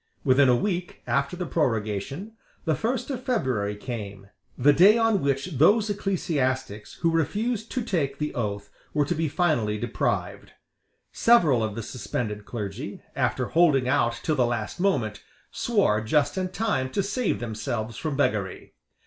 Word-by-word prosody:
Within 135 0 +5
a 125 - +5
week 180 +5 -3
after 140 +5 0
the 180 - -3
prorogation, 135 - -2 0.3
the 160 - +2
first 245 - -2
of 255 -2 -4
February 130 - 0
came, 100 -3 -7 0.3
the 145 +3 +5
day 195 +9 +7
on 225 -4 +2
which 140 +2 -1
those 210 +7 +5
ecclesiastics 130 - -2
who 165 - +4
refused 215 - -1
to 255 - -1
take 145 - -1
the 150 +1 -3
oath 100 -4 -3 0.2
were 145 -1 +3
to - - -1
be 160 +1 -1
finally 140 - +1
deprived. - - -2 0.6
Several 160 - +4
of 110 -1 -3
the 115 - -4
suspended 105 -3 -4
clergy, 105 -5 -6
after - - 0
holding 150 -7 +4
out 120 -4 +1
till 155 - +1
the 130 - +3
last 120 +2 -3
moment, 115 - 0 0.3
swore 200 - +1
just 145 +6 +1
in 185 -1 -1
time 185 -10 -1
to 200 +9 -1
save 205 +3 -1
themselves 110 0 -4
from 150 +1 -3
beggary. 105 -9 -1
140 Hz, 155 wpm, -26 LUFS, 115-185 Hz, 0.6 s, day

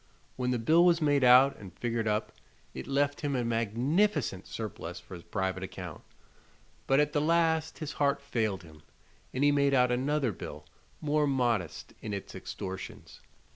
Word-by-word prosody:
When 125 -1 -1
the 125 - +1
bill 160 +9 +4
was 175 -2 +5
made 145 -3 +2
out 130 +2 +7
and 95 -4 -12
figured 115 -2 -1
up 105 +1 0 0.4
it 65 - -7
left 145 +1 0
him 145 -3 -1
a 125 -2 0
magnificent 120 - 0
surplus 90 -6 -6
for - - -13
his 85 - -8
private 95 -2 -2
account; 90 -3 -7 0.9
but 135 +1 +4
at 150 0 +2
the 145 - +2
last 160 0 +2
his 155 -3 -5
heart 140 -1 +1
failed 110 -8 -2
him, 80 -2 -15 0.5
and 130 - -1
he 145 - +6
made 140 -1 +3
out 125 -1 +4
another 135 +1 +1
bill 75 -5 -8 0.4
more 150 -1 +2
modest 120 - -1
in 105 -2 -4
its 100 - -7
extortions. 95 -1 -7
125 Hz, 170 wpm, -30 LUFS, 100-145 Hz, 0.9 s, out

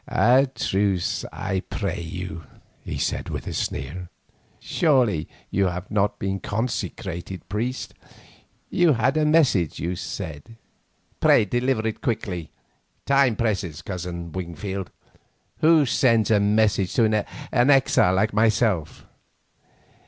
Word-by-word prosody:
"A 130 +4 +4
truce, 95 -2 0
I 95 -1 -2
pray 95 -1 -4
you," 90 0 -6 0.4
he - - -5
said - - -2
with - - -5
a - - -5
sneer. 85 +6 -4 0.5
"Surely 125 - +1 0.2
you 95 0 +2
have 90 +1 -5
not 105 -1 +1
been 95 0 -2
consecrated 95 -5 -4
priest. 120 +6 -3 0.8
You 175 -3 +4
had 125 +4 +1
a 155 -1 +2
message, 140 - +3
you 90 +2 -2
said. 85 +1 -7 0.6
Pray - - +5
deliver 120 0 0
it 110 - -4
quickly. 95 -8 -3 0.6
Time 135 -4 +3
presses, 95 -8 -2
Cousin 85 -2 -5
Wingfield. 95 +2 -5 0.7
Who 160 -2 +5
sends 115 -4 +2
messages 105 -2 +2
to 115 - +4 0.5
an 125 +2 +3
exile 130 -9 +4
like 105 +3 +1
myself?" 110 -6 +1
100 Hz, 115 wpm, -24 LUFS, 90-120 Hz, 0.8 s, Pray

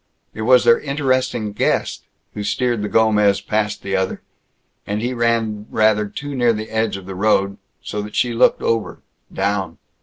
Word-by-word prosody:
It - - -7
was 125 +2 +5
their 120 -1 +5
interesting 130 -7 -1
guest - - -1 0.3
who 105 - -5
steered 120 +1 0
the 105 - -3
Gomez 105 -2 +3
past 105 0 -2
the 95 0 -2
other; 95 0 -2 0.6
and 105 +1 -2
he 120 +3 -2
ran 115 -3 0
rather 110 -1 +2
too 145 +7 -7
near 120 -3 +2
the 110 0 -6
edge 110 -2 0
of 95 - -11
the 95 - -7
road... 100 0 +1 0.3
so 105 - -4
that 105 0 -8
she 120 -1 +1
looked 115 - +3
over, 115 -2 -1 0.3
down. 100 -1 -2
110 Hz, 175 wpm, -20 LUFS, 105-120 Hz, 0.6 s, was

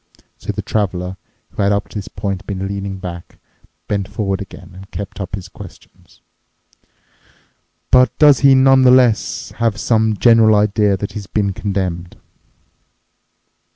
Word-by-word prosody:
So - - -4
the - - -5
Traveler, 95 -3 -2 0.4
who - - -4
had 100 0 +2
up 100 0 -1
to 105 - -5
this 100 - -9
point 100 -1 -5
been 95 -1 -4
leaning 100 -1 -5
back, 90 -2 -9 0.5
bent 100 -2 -2
forward 100 -1 -3
again 95 -2 -11
and 95 +2 -13
kept 100 0 -7
up 95 - -4
his 95 -2 -9
questions, - - -15 1.7
"But 125 0 +4
does 145 -3 +6
he 135 -1 +6
nonetheless 130 -8 +3
have 115 -4 0
some 110 -2 +1
general 115 -2 +5
idea 105 -1 +2
that 100 +1 -5
he's 105 -3 -8
been 100 -2 -1
condemned?" 90 -4 -4
100 Hz, 140 wpm, -17 LUFS, 95-110 Hz, 1.7 s, does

